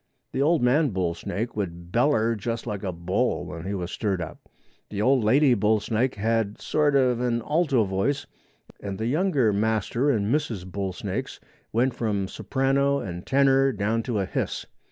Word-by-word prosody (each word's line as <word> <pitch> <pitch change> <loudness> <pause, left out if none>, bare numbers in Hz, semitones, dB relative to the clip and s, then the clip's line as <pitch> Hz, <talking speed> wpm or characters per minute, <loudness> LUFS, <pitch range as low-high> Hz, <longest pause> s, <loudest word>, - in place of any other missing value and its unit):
The 130 - -1
old 155 -1 +3
man 140 +5 +3
bull 90 -5 -1
snake 105 +7 -4
would 85 -4 -5
beller 115 -2 +3
just 115 +2 -4
like 105 -4 -4
a 95 - -2
bull 90 +8 -1
when 85 -1 -7
he 100 - -2
was 90 -2 -4
stirred 100 -5 -1
up. 85 - -6 0.5
The 100 - -5
old 130 +2 +3
lady 130 +5 +5
bull 110 -1 +2
snake 120 +5 0
had 110 0 0
sort 150 -2 +1
of 125 -3 +3
an 120 -2 0
alto 150 -7 +2
voice 100 +9 -1 0.5
and 100 -1 -5
the 110 - -3
younger 140 - +2
master 110 +5 +1
and 110 -5 +1
misses 120 -11 -1
bull 95 +1 -3
snakes 90 - -5 0.3
went 125 +3 +2
from 105 -5 -1
soprano 140 +4 +1
and 90 -7 -6
tenor 135 0 +4
down 110 +1 0
to 115 -1 -2
a 100 - 0
hiss. - - -3
115 Hz, 175 wpm, -25 LUFS, 100-135 Hz, 0.5 s, lady